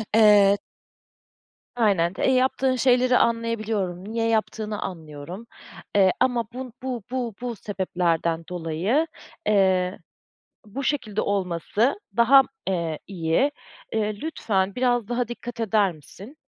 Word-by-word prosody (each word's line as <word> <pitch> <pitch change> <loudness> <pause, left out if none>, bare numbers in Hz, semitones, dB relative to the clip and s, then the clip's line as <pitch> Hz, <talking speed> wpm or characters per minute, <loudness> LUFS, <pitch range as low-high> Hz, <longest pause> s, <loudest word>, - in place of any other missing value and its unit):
Eee 205 -2 +6 1.2
Aynen, 195 -7 +2
d - - -11
e, 265 - +4
yaptığın 260 0 +2
şeyleri 250 0 +4
anlayabiliyorum. 220 -6 0
Niye 225 +3 -2
yaptığını 215 -1 -1
anlıyorum, 165 +4 -7 0.5
eee, 190 -2 +5
ama 245 -2 +2
bun 255 -1 -7
bu 250 -4 -3
bu 245 -5 -3
bu 245 -1 -3
sebeplerden 175 -4 -1
dolayı, 180 - 0 0.4
eee, 190 -2 +2 0.7
bu 235 +7 -6
şekilde 225 -8 -1
olması 200 - 0 0.2
daha, 255 +4 +7 0.3
eee, 170 -4 -1
iyi. 180 - +1 0.4
Eee, 215 -1 0
lütfen 200 -11 -1
biraz 245 -3 +1
daha 240 0 -1
dikkat 240 0 -7
eder 215 -3 +2
misin? 195 - -13
215 Hz, 115 wpm, -24 LUFS, 185-245 Hz, 1.2 s, daha